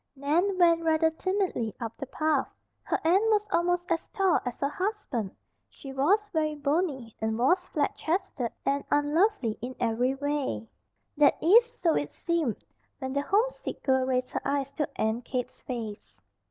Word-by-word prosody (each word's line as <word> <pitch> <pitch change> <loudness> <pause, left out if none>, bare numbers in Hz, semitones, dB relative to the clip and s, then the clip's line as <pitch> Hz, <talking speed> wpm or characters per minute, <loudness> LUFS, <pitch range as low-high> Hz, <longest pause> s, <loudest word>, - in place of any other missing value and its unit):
Nan 330 +8 +1
went 335 -2 +4
rather 320 0 +3
timidly 365 - -1
up 230 -2 -5
the 275 - -6
path. 305 0 0 0.3
Her - - -1
aunt 360 +5 +5
was 425 -1 +2
almost 355 0 +1
as 330 - 0
tall 385 -3 +2
as 245 - -4
her 280 - +1
husband. 330 - -3 0.4
She 270 -1 -10
was 380 +11 +2
very 310 -2 0
bony 285 -5 -1
and 220 0 0
was 355 +10 +2
flat 295 -5 -1
chested 320 - -2
and 280 +1 +1
unlovely 290 - +2
in 250 +2 -5
every 245 +3 +1
way. 285 -4 -2 0.5
That 290 -1 +5
is, 465 +8 +5
so 345 -9 +1
it 145 0 -1
seemed, 335 -9 -2 0.3
when 265 -1 -4
the 280 - +1
homesick 425 +11 -1
girl 260 -1 +2
raised 255 -1 0
her - - -2
eyes 275 -1 -1
to 295 +1 -2
Aunt 220 +3 -1
Kate's 250 0 -4
face. 225 -4 -6
290 Hz, 165 wpm, -28 LUFS, 255-355 Hz, 0.5 s, aunt